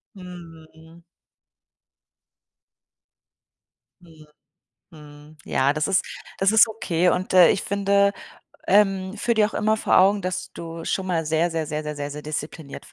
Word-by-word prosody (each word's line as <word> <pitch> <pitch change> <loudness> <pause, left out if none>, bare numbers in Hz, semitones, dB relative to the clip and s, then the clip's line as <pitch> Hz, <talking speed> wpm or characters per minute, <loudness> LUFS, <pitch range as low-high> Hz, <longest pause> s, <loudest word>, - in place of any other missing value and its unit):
Mhm. 165 -2 -14 3.0
Mhm, 160 -3 -18 0.6
mhm, 150 -1 -15
ja, 135 +2 +1
das 150 0 -2
ist 195 -1 +1 0.3
das 195 +2 +2
ist 220 +1 +6
okay 180 -5 -1
und, 185 +1 -1
äh, 180 -2 +7
ich 195 - -1
finde, 200 0 +1 0.5
ähm, 195 -1 +2
führe 235 +3 0
dir 215 -1 +3
auch 220 - -9
immer 215 +1 +1
vor - - +2
Augen, 200 +2 +3
dass 185 0 -4
du 165 0 -8
schon 190 +2 -2
mal 165 -3 -2
sehr, 160 +3 0
sehr, 165 -1 -3
sehr, 150 +1 -4
sehr, 150 -1 -6
sehr 145 0 -5
sehr 150 +1 -8
diszipliniert 150 -1 -7
170 Hz, 145 wpm, -23 LUFS, 155-195 Hz, 3.0 s, äh